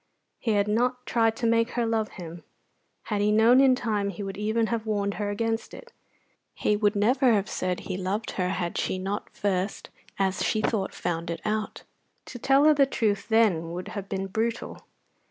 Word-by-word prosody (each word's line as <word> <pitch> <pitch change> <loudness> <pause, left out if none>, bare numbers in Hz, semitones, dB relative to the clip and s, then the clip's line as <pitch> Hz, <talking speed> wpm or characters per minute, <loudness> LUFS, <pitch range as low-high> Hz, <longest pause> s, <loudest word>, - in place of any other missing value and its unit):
He 225 - 0
had 205 0 +2
not 250 +4 0
tried 225 -1 +2
to 230 - -3
make 230 +1 +2
her 240 -1 0
love 225 -1 0
him. 170 -1 -8 0.6
Had 210 -2 -2
he 210 +1 +3
known 230 +4 +6
in 265 -2 +5
time 210 -5 -1
he 200 +1 -6
would 195 0 -5
even 220 +2 0
have 225 -1 -3
warned 200 -2 0
her 205 - -1
against 225 +2 -2
it. 485 -1 -13 0.6
He 210 - +1
would 205 0 +1
never 245 +4 +3
have 205 -1 +1
said 185 -1 -2
he - - -4
loved 195 +4 -2
her 180 -1 -1
had 180 -2 -2
she - - -1
not 195 +2 -4
first, 195 0 -2 0.3
as 190 -1 0
she 215 - +1
thought, 215 -2 -1
found 170 -1 -3
it 170 - -3
out; 215 0 -2 0.4
to 245 - -9
tell 270 +4 +4
her 310 - +7
the 280 -2 +4
truth 210 -6 -1
then 190 -8 +2
would 180 +1 -5
have 200 -2 -6
been 195 0 -2
brutal. 225 +4 -3
210 Hz, 195 wpm, -26 LUFS, 195-230 Hz, 0.6 s, her